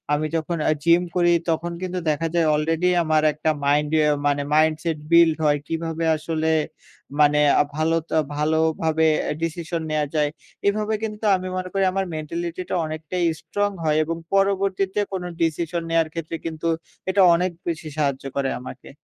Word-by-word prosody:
আমি 155 +1 -1
যখন 160 +2 -2
অ্যা 155 - +3
জিম 170 +1 +5
করি, 175 -1 +4 0.2
তখন 170 +1 -1
কিন্তু 185 0 -3
দেখা 155 +2 0
যায় 165 -2 +3
অলরেডি 165 +4 +1
আমার 155 -1 +2
একটা 155 +1 -1 0.2
মাইন্ডে 150 +2 +2 0.3
মানে 145 0 +1
মাইন্ডসেট 155 +1 +2
বিল্ড 170 -1 +6
হয়। 145 -1 +3
কিভাবে 165 0 -3
আসলে 160 0 -2 0.7
মানে 150 0 +5 0.4
ভালোতা 160 +1 0 0.2
ভালোভাবে 160 +1 +1 0.3
ডিসিশন 165 0 -3
নেয়া 155 -1 +1
যায়। 150 -1 +2 0.4
এভাবে 215 +1 +1
কিন্তু 215 0 -4
আমি 185 0 -4
মনে 185 0 -4
করি, 195 -1 +1
আমার 195 +1 -1
মেন্টালিটিটা 170 +4 -4
অনেকটাই 155 +3 -3
স্ট্রং 205 0 -1
হয় 155 -1 +2
এবং 165 +1 -3 0.2
পরবর্তীতে 195 0 +1
কোনো 180 -2 -3
ডিসিশন 165 +1 0
নেয়ার 165 -1 +2
ক্ষেত্রে 165 0 -4
কিন্তু 165 0 -3 0.4
এটা 195 +1 +3
অনেক 180 +2 0 0.2
বেশি 165 -2 -3
সাহায্য 140 -3 0
করে 135 -1 0
আমাকে। 125 0 -10
165 Hz, 150 wpm, -23 LUFS, 155-175 Hz, 0.7 s, বিল্ড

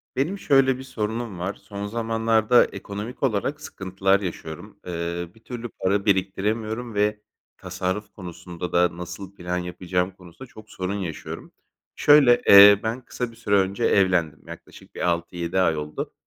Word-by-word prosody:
Benim 160 +10 -1
şöyle 135 -4 +3
bir 130 - -8
sorunum 115 -5 -4
var. 95 +3 -2
Son 100 -1 -7
zamanlarda 115 +1 +2
ekonomik 105 +6 -7
olarak 135 +5 0
sıkıntılar 95 -4 0
yaşıyorum. 80 -5 -7
Eee, 85 0 -4
bir 110 - -19
türlü 120 -1 -6
para 100 0 -1
biriktiremiyorum 110 +4 -1
ve 105 +1 0 0.4
tasarruf 95 +3 -4
konusunda 90 -1 -8
da 90 -1 +2
nasıl 95 +3 -8
plan 90 -1 -3
yapacağım 90 +1 -2
konusunda 90 +7 -14
çok 110 0 -14
sorun 95 +1 -3
yaşıyorum. 90 -6 -6 0.4
Şöyle, 140 -5 +6
eee, 100 0 +10
ben 115 +3 -2
kısa 125 -2 -4
bir - - -17
süre 105 -3 0
önce 95 0 +1
evlendim 90 -6 +2
yaklaşık - - -13
bir - - -6
6-7 85 +1 -2
ay 85 -4 +2
oldu 75 0 -5
100 Hz, 150 wpm, -24 LUFS, 90-115 Hz, 0.4 s, eee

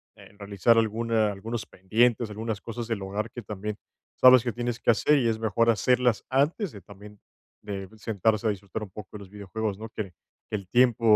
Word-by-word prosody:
eh, - - -16
realizar 100 +3 +3
alguna 110 -1 +1
algunos 110 +3 -5
pendientes, 115 +4 +1
algunas 110 -1 -4
cosas 115 +1 -6
del 115 -4 -2
hogar 105 +3 -3
que 120 - -8
también, 105 +1 -5 0.4
sabes 130 -2 +8
que 120 - -1
tienes 120 -1 -3
que - - -1
hacer 145 +6 +3
y 120 - +1
es 110 -1 +1
mejor 115 +1 +2
hacerlas 125 +1 +2
antes 150 - +1
de 100 - -10
también 100 +2 -14 0.4
de 100 -2 -6
sentarse 110 +1 0
a - - +3
disfrutar 100 +1 -4
un 105 - -8
poco 95 0 -10
de 105 - -7
los 100 -2 -12
videojuegos, 105 +1 -4
¿no?, 110 +2 -8
que 105 -4 -6 0.4
que - - -2
el 100 -3 -5
tiempo 120 -3 +5
110 Hz, 200 wpm, -27 LUFS, 100-115 Hz, 0.4 s, sabes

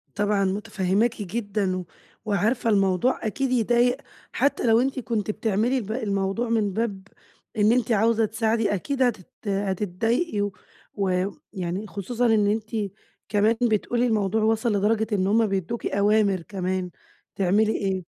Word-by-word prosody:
طبعًا 205 -1 +1
متفهماكِ 205 +3 0
جدًا 200 -2 -2
و 180 - -5 0.4
وعارفة 220 +3 +1
الموضوع 195 +4 +2
أكيد 265 +4 -1
يضايق 245 +1 +3 0.3
حتى 280 -3 +1
لو 225 +1 +5
أنتِ 265 0 -1
كنتِ 220 -4 -2
بتعملي 225 +5 0
الب 220 -3 -4
الموضوع 205 0 -1
من 210 -4 +1
باب 200 -4 -3 0.5
إن 210 +1 +4
أنتِ 240 -1 +1
عاوزة 225 +1 +3
تساعدي، 225 0 0
أكيد 265 +8 -2
هتت 210 -7 -1 0.2
هتتضايقي، 205 - -1
و 205 -1 -1 0.4
ويعني 190 - -3
خصوصًا 225 +5 -2
إن 220 -3 +3
أنتِ 215 +1 -1 0.6
كمان 210 +2 +3
بتقولي 240 +1 +1
الموضوع 215 -1 +1
وصل 225 +2 +2
لدرجة 215 +2 +1
إن 190 -2 +1
هُم 220 +2 +3
بيدوكِ 195 +4 -3
أوامر 200 -2 +2
كمان 185 0 -3 0.5
تعملي 200 +3 +2
إيه. 190 -3 -1
210 Hz, 135 wpm, -25 LUFS, 195-230 Hz, 0.6 s, لو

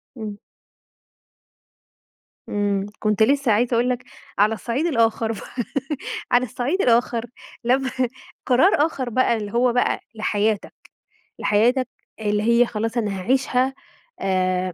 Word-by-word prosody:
امم. 215 -4 -6 2.1
امم. 200 -1 0
كنت 215 0 +2
لسه 275 0 +3
عايزة 235 +4 +2
أقول 240 +2 +2
لَك، 250 0 -2 0.4
على 210 +2 +4
الصَعيد 240 +7 -2
الآخر 230 -6 +1
بقى، 240 +3 -5 0.7
على 245 +1 +4
الصَعيد 270 - -1
الآخر 235 -1 +2 0.4
لما 260 +2 +2 0.6
قرار 260 +9 +5 0.2
آخر 260 -6 -3
بقى 240 -1 +2
اللي 205 -1 -5
هو 240 0 +3
بقى 245 - +1 0.2
لحياتَك، 215 -1 0 0.7
لحياتَك 245 +5 +2 0.3
اللي 210 -1 0
هي 235 +1 +4
خلاص 225 +1 -3
أنا 205 -4 -1
هاعيشها، 260 +3 +1 0.5
آآ 185 -1 0
235 Hz, 120 wpm, -22 LUFS, 210-250 Hz, 2.1 s, قرار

